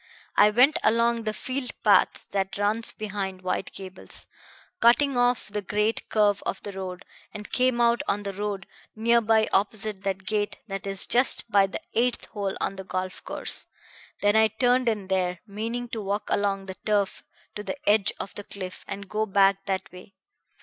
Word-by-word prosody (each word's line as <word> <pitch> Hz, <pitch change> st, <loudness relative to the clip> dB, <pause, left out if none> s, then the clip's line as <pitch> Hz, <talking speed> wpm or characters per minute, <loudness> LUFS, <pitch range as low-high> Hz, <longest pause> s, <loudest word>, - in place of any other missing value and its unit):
I 205 Hz, -, +7 dB
went 260 Hz, +9 st, +4 dB
along 230 Hz, 0 st, +2 dB
the 215 Hz, -, 0 dB
field 255 Hz, +3 st, -4 dB
path -, -, +4 dB
that 195 Hz, -1 st, -1 dB
runs 210 Hz, +3 st, +2 dB
behind 195 Hz, -3 st, -5 dB
White 185 Hz, -, -2 dB
Gables, 190 Hz, -1 st, -7 dB, 0.5 s
cutting 265 Hz, +4 st, +4 dB
off 245 Hz, -2 st, +2 dB
the 210 Hz, 0 st, -3 dB
great 210 Hz, +3 st, -1 dB
curve 205 Hz, -2 st, +3 dB
of -, -, -3 dB
the 205 Hz, -, -5 dB
road, 190 Hz, -1 st, -6 dB, 0.3 s
and 210 Hz, -1 st, -8 dB
came 255 Hz, -1 st, +2 dB
out 235 Hz, 0 st, +3 dB
on 205 Hz, +1 st, 0 dB
the 200 Hz, -1 st, -4 dB
road 200 Hz, -1 st, -3 dB, 0.3 s
nearly 225 Hz, -1 st, +3 dB
opposite 210 Hz, 0 st, 0 dB
that 195 Hz, -1 st, -3 dB
gate 205 Hz, +1 st, -1 dB
that 195 Hz, -1 st, -5 dB
is 195 Hz, -1 st, +1 dB
just 245 Hz, -2 st, +4 dB
by 200 Hz, -1 st, +5 dB
the 195 Hz, -, -6 dB
eighth 245 Hz, +1 st, +1 dB
hole 200 Hz, -3 st, -3 dB
on 195 Hz, -, -2 dB
the 190 Hz, -, -6 dB
golf 185 Hz, 0 st, -4 dB
course. -, -, -2 dB, 0.6 s
Then 205 Hz, +1 st, +4 dB
I 220 Hz, 0 st, +6 dB
turned 245 Hz, +3 st, +2 dB
in 210 Hz, -4 st, -2 dB
there, 180 Hz, -2 st, 0 dB
meaning 230 Hz, +4 st, -4 dB
to 225 Hz, -2 st, -4 dB
walk 205 Hz, +1 st, -3 dB
along 195 Hz, -1 st, 0 dB
the 190 Hz, -1 st, -8 dB
turf 205 Hz, -2 st, 0 dB, 0.3 s
to 210 Hz, -, -4 dB
the 210 Hz, +6 st, -5 dB
edge 205 Hz, -1 st, +4 dB
of -, -, -6 dB
the 205 Hz, -, -5 dB
cliff, 185 Hz, -2 st, -7 dB
and 200 Hz, 0 st, -6 dB
go 215 Hz, +2 st, -1 dB
back 195 Hz, 0 st, +3 dB
that 190 Hz, -1 st, -3 dB
way. 180 Hz, +2 st, -13 dB
205 Hz, 180 wpm, -26 LUFS, 195-225 Hz, 0.6 s, I